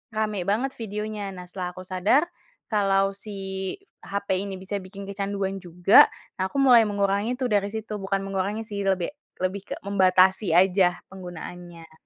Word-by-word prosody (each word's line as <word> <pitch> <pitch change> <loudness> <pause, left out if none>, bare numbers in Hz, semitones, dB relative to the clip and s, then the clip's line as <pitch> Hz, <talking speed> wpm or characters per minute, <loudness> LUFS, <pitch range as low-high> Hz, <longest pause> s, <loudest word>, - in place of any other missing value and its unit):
rame 215 -3 -1
banget 240 +7 +1
videonya. 210 -2 -4
Nah 180 - -8
setelah 180 -1 -4
aku 185 - -8
sadar 195 - +3 0.5
kalau 195 -2 +2
si 210 +2 -8 0.7
hape 200 -1 -2
ini 195 0 -4
bisa 190 +2 -5
bikin 195 +1 -9
kecanduan 195 -1 -2
juga, 180 +2 +6 0.3
nah 190 0 0
aku - - -4
mulai 245 -4 +7
mengurangi 205 +3 0
itu 260 - 0
dari 205 -1 +2
situ, 220 -1 -4
bukan 195 0 -1
mengurangi 195 +3 -2
sih 205 -2 -4
lebih 190 -3 +1 0.3
lebih 185 +1 -1
ke - - -4
membatasi 190 -1 +4
aja 180 0 +4
penggunaannya. 175 -2 -9
195 Hz, 155 wpm, -25 LUFS, 185-205 Hz, 0.7 s, mulai